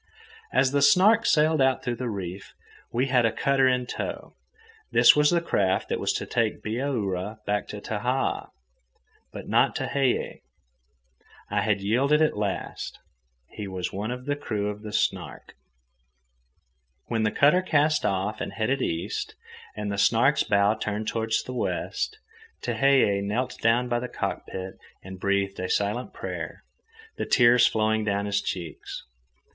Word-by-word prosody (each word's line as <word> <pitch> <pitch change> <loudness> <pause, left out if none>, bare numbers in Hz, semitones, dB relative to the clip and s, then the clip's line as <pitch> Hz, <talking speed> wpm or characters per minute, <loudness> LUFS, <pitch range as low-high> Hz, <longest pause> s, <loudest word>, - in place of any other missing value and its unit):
As 130 - +3
the 140 0 +1
Snark 215 +7 +5
sailed 155 -1 +3
out 130 0 +2
through 120 -1 -2
the 125 -2 -3
reef, 95 -2 -6 0.4
she 125 +3 +1
had 130 -3 +3
a 115 - +3
cutter 135 +2 +2
in 125 -1 +1
tow. - - -5 0.6
This - - +7
was 150 0 +4
the 170 -1 +2
craft 95 - 0
that - - -1
was - - 0
to - - -3
take - - -1
Bihaura 110 -5 -2
back 105 0 -1
to 105 - -7
Tahaa—but 105 - -5
not - - +3
Tehei. 135 -3 -1 1.1
I 105 0 +1
had 100 -1 0
yielded 130 +9 +2
at 155 -1 +2
last, 105 -2 -4 0.5
and - - -19
he 105 - -4
was 95 -2 -4
one 105 +3 -3
of 125 +1 -5
the 145 0 0
crew 105 -7 -2
of 105 0 -10
the 105 -1 -7
Snark. - - -2 1.5
When 115 -2 -1
the 110 - +2
cutter 150 - +4
cast 155 -3 +2
off 100 +3 -1
and - - -4
headed 130 +5 -1
east, 85 -6 -3 0.4
and 105 -1 -3
the 100 - -2
Snark's 135 +7 +4
bow 100 0 +3
turned 105 0 -4
toward 110 0 -2
the 130 - -6
west, 430 - -2 0.5
Tehei 135 -8 +3
knelt 115 +6 -2
down 115 +2 +2
by 120 0 0
the 125 - -4
cockpit 95 0 -5 0.2
and 95 0 -9
breathed 100 0 0
a 90 - -3
silent 105 +5 -1
prayer, - - -6 0.5
the - - -2
tears 120 -1 +5
flowing 110 0 +1
down 100 -1 -1
his 105 0 0
cheeks. 85 -5 -6
110 Hz, 155 wpm, -26 LUFS, 100-130 Hz, 1.5 s, This